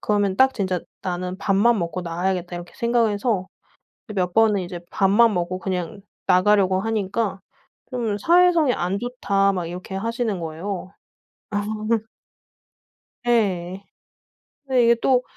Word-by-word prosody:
그러면 205 -2 +1
딱 265 +4 +4
진짜 185 -3 -1 0.2
'나는 180 0 -3
밥만 210 +3 +3
먹고 170 +1 -3
나와야겠다.' 175 +1 -2
이렇게 175 0 -9
생각을 235 -2 +1
해서 205 -3 -1 0.7
몇 180 -2 0
번은 215 -2 +4
이제 175 0 -6
밥만 210 +3 +4
먹고 180 +1 -2
그냥 185 +2 -4 0.3
나가려고 190 0 +4
하니까 210 -1 -1 0.5
좀 230 -5 -1
"사회성이 340 - +4
안 185 0 -1
좋다." 200 -5 +1
막 180 -3 -3
이렇게 180 +3 -7
하시는 225 0 -2
거예요. 175 +4 -5 0.6
아. 205 0 -1 1.6
예. 195 -5 0 0.8
근데 255 -2 +3
이게 235 0 +6
또 255 -1 +3
195 Hz, 265 characters per minute, -23 LUFS, 185-230 Hz, 1.6 s, 이게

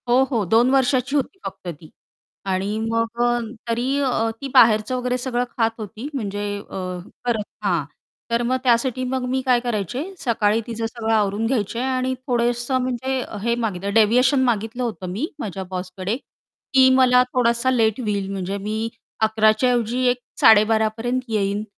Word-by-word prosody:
हो, 250 +2 +5
हो 230 -5 +1
2 235 +3 +5
वर्षाची 265 0 +2
होती 295 +7 -1
फक्त - - -7
ती. 160 -2 -8 0.6
आणि 195 +3 -1
मग 230 +1 -1
अ, 240 0 +2 0.3
तरी 245 +4 0
अ, 245 -5 +1
ती 275 - -3
बाहेरचं 215 +2 +5
वगैरे 250 0 -1
सगळं 245 -1 -1
खात 225 -1 +2
होती, 215 +4 -7
म्हणजे 205 -5 -3 0.2
अ, - - -9 0.5
करत 230 -3 0 0.2
हां. 175 -6 +1 0.5
तर 235 0 +2
मग 255 +1 +1
त्यासाठी 250 +1 +2
मग 255 0 -2
मी 260 +1 0
काय 250 -2 +4
करायचे 240 - -2 0.2
सकाळी 225 -2 +1
तिचं 230 -1 -3
सगळं 225 -1 -2
आवरून 210 0 +1
घ्यायचे 230 -2 -1
आणि 260 0 0
थोडंसं 240 +1 +1
म्हणजे 255 +1 -2 0.2
हे 235 0 +1
मागितलं 200 -3 -2
डेविएशन 250 +5 +4
मागितलं 230 0 -1
होतं 215 -6 -4
मी 215 +11 -2
माझ्या 195 -2 -4
बॉसकडे 185 +2 -4 0.6
की 260 -1 +7
मला 250 -1 +5
थोडासा 240 +1 +2
लेट 225 -2 +2
होईल 200 -4 -2
म्हणजे 195 0 -3
मी 215 +3 -3 0.3
11:00 220 0 +4
च्या 250 +4 +1
ऐवजी 240 +1 0
एक 245 0 0 0.2
12:30 220 0 +6
पर्यंत 245 +3 -1
येईन 205 -1 0
235 Hz, 165 wpm, -22 LUFS, 215-250 Hz, 0.6 s, की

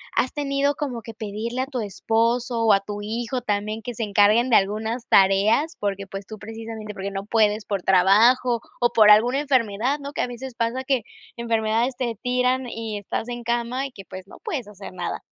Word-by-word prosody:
¿has 255 - +1
tenido 280 0 0
como 265 -6 -4
que 225 0 -10
pedirle 225 +3 -4
a - - -1
tu 265 -3 -4
esposo 230 +3 0
o 220 -2 +5
a 195 - +4
tu 205 +1 -6
hijo 235 +4 -3
también 215 0 -2
que 240 +1 -6
se 225 - -3
encarguen 210 +4 +3
de - - +6
algunas 220 +4 -1
tareas? 200 - +3
Porque, 200 -1 -2
pues, 195 0 -8
tú 215 - -8
precisamente, 220 0 -8
porque 195 +1 -5
no 195 0 -5
puedes 215 -1 +2
por 200 -3 -2
trabajo 225 +7 +4 0.2
o 240 - +4
por 215 -2 +6
alguna 240 +6 +5
enfermedad, 255 -2 +1
¿no? 280 +1 -7
Que - - -2
a - - 0
veces 245 +1 -7
pasa 235 +3 -1
que 265 -2 +1 0.4
enfermedades 230 +2 0
te 245 -2 -1
tiran 250 0 +1
y 225 -3 -5
estás 220 +3 -4
en 240 0 -5
cama 240 +3 -1
y - - -15
que, 195 -6 -12
pues, 185 +1 -10
no - - -13
puedes 255 -9 -4
hacer 200 -2 -10
nada. - - -4
225 Hz, 205 wpm, -23 LUFS, 210-250 Hz, 0.4 s, de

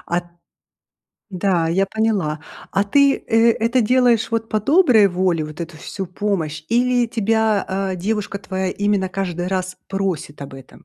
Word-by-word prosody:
А - - +3
т 175 - -21 1.1
Да, 180 -3 +1
я 190 +4 +1
поняла. 195 -8 -1 0.3
А 195 +1 +2
ты, 280 +6 +4
э, 225 0 +3
это 230 +3 +1
делаешь 240 -1 +3
вот 225 0 -2
по 215 - +1
доброй 255 - +5
воле, 180 -3 0
вот 155 +2 -7
эту 165 -1 -9
всю 195 - -6
помощь, 170 -5 -3
или 245 +1 +2
тебя, 220 -2 +1 0.3
э, 185 - -4
девушка 200 +2 -2
твоя 190 -1 -3
именно 205 -1 0
каждый 180 -2 -3
раз 185 -1 -3
просит 185 -7 -3
об 135 - -9
этом? 135 -1 -14
195 Hz, 160 wpm, -20 LUFS, 180-225 Hz, 1.1 s, доброй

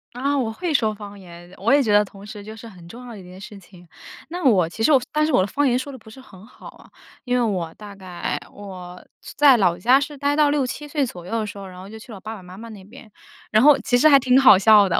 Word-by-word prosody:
啊， 280 +3 -1
我 240 -5 -1
会 335 +7 -4
说 220 -6 +1
方 205 -1 -11
言， 175 -1 -14
我 225 +7 +1
也 285 - +5
觉 215 -5 0
得 210 0 +5
同 195 0 -14
时 210 -1 -10
就 215 +1 -10
是 225 +1 -12
很 180 -5 -15
重 250 +4 -11
要 240 - -9
的 210 - -11
一 - - -12
件 180 +1 -13
事 205 +1 -11
情。 180 -2 -18 0.4
那 350 +3 -7
我 190 -10 +4
其 220 +6 -6
实 310 - +3
我 270 -4 +5
但 305 0 +2
是 315 - -1
我 250 - +3
的 185 - -1
方 290 +8 -1
言 250 -2 +1
说 270 +2 -7
得 265 - -10
不 220 -2 -17
是 240 +5 -14
很 205 -7 -16
好 240 - -15
啊。 - - -16 0.3
因 250 - -3
为 - - +1
我 185 -8 -2
大 205 -1 -12
概 185 -3 -5
我 180 -3 -11 0.4
在 285 -2 +6
老 180 -6 +1
家 250 +9 +3
是 285 0 -6
呆 285 +1 0
到 300 -1 +3
6-7 290 0 -2
岁 290 -1 -1
左 180 -8 -10
右 - - -10
的 215 - -3
时 205 0 -9
候， 200 - -9
然 185 -1 -12
后 185 - -11
就 220 +2 -11
去 220 +3 -14
了 205 - -9
我 - - -13
爸 220 +3 -8
爸 190 - -13
妈 180 +1 -13
妈 230 +2 -10
那 205 -3 -12
边， 220 +3 -15 0.4
然 215 +2 +3
后 295 -1 +7
其 245 +1 0
实 305 +5 +5
还 275 -2 +7
挺 255 -1 +2
好 250 -8 +7
笑 205 -1 +5
的， - - +1
220 Hz, 315 characters per minute, -21 LUFS, 190-265 Hz, 0.4 s, 后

